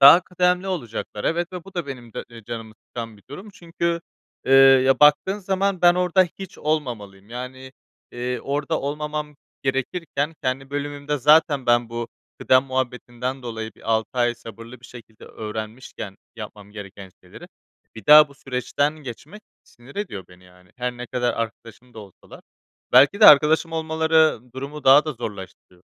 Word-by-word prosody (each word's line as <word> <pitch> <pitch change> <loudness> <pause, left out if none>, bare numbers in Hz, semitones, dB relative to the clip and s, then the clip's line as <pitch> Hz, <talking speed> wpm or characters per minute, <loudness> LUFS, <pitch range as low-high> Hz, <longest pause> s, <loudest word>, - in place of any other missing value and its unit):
Daha 140 +6 +10
kıdemli 180 +1 0
olacaklar, 120 - -5
evet, 175 +2 -1
ve 180 -2 -7
bu 195 -1 -14
da 175 -5 -3
benim 120 -4 -9
de, - - -6
eee, 115 -2 -13
canımı 110 -1 -7
sıkan 115 -3 -7
bir 100 - -21
durum 190 +9 -9
çünkü, 170 -3 -3 0.5
eee, - - +2
ya, 135 -1 +6
baktığın 150 +7 +4
zaman 195 -1 -1
ben 175 0 +7
orada 180 +1 +3 0.2
hiç 195 -2 -9
olmamalıyım. 115 -10 -3
Yani, 130 +2 -8 0.4
eee, 125 +1 -3
orada 140 +1 -2
olmamam 150 +1 -4 0.3
gerekirken 145 +3 -2
kendi 135 +1 -2
bölümümde 145 0 -3
zaten 145 -1 +4
ben 120 -1 +3
bu 115 0 -5 0.3
kıdem 130 0 +4
muhabbetinden 130 0 -4
dolayı 110 -2 -5
bir 115 - -6
6 110 0 0
ay 120 0 +2
sabırlı 115 +1 -12
bir 125 - -13
şekilde 115 -3 -14
öğrenmişken 110 -1 -7 0.2
yapmam 105 -2 -10
gereken 100 -2 -10
şeyleri, - - -13 0.5
bir 110 -3 -12
daha 150 0 +9
bu 140 - -17
süreçten 140 +2 -2
geçmek 150 - -10 0.2
sinir 120 +7 -18
ediyor 180 - -5
beni, 90 0 -18
yani, 90 0 -21
her 125 0 -3
ne 125 0 -7
kadar 125 0 -1
arkadaşım 115 +2 -7
da 110 - -10
olsalar. 100 -3 -14 0.5
Belki 140 - +6
de 210 - +9
arkadaşım 155 +3 +6
olmaları 160 -2 +2
durumu 140 +2 -7
daha 140 +3 +7
da 155 - -3
zorlaştırıyor. 95 -5 -9
130 Hz, 160 wpm, -22 LUFS, 115-155 Hz, 0.5 s, Daha